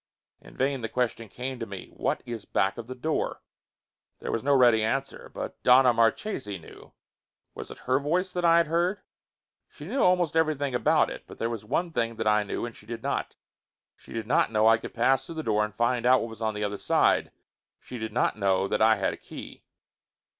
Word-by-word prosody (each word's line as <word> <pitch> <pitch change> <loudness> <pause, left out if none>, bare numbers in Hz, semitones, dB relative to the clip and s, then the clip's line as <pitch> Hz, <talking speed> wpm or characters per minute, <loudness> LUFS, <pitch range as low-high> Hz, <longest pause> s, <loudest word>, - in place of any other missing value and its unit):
In - - -16
vain 135 -1 0
the 115 - -3
question 115 -2 -2
came 125 +5 -5
to 115 - -4
me. 100 -2 -9
What - - -1
is 115 -3 -6
back 95 +3 0
of 115 - -7
the 130 - -6
door? 155 +5 -2 0.8
There - - -4
was 115 - -2
no 140 +1 +3
ready 120 -4 +5
answer. 135 +5 -2
But, - - -7
Donna 125 0 +6
Marchesi 115 - 0
knew! 80 - -15 0.6
Was - - -8
it - - -9
her 130 +1 +2
voice 180 +6 -1
that 180 - -2
I 170 -1 +6
had 170 - +4
heard? 175 +5 0 0.7
She - - -12
knew 270 - -1
almost 180 -4 +3
everything 150 -4 +1
about 125 - +3
it, - - -8
but - - -12
there 115 +1 -2
was 115 -3 -5
one 165 +10 -1
thing 115 -5 -1
that 110 - -3
I 105 0 +4
knew 105 +3 -3
and 120 - -8
she 105 - -15
did 115 0 -6
not. - - -2 0.6
She - - -18
did 115 -1 -4
not 115 - +2
know 110 -1 +2
that 110 - +7
I 115 - +5
could - - -9
pass 130 +3 +3
through 165 - -7
the 160 - -4
door 105 -3 +1
and 105 0 -5
find 120 +1 +1
out 130 +1 +5
what 115 - -4
was 110 0 -11
on 110 -1 -1
the 105 - -3
other 105 0 -3
side. - - +2 0.5
She 125 - -9
did 110 0 -4
not 120 - +1
know 95 -1 +2
that 105 - -1
I 110 0 +6
had - - -1
a - - -8
key. - - -11
120 Hz, 225 wpm, -27 LUFS, 110-140 Hz, 0.8 s, that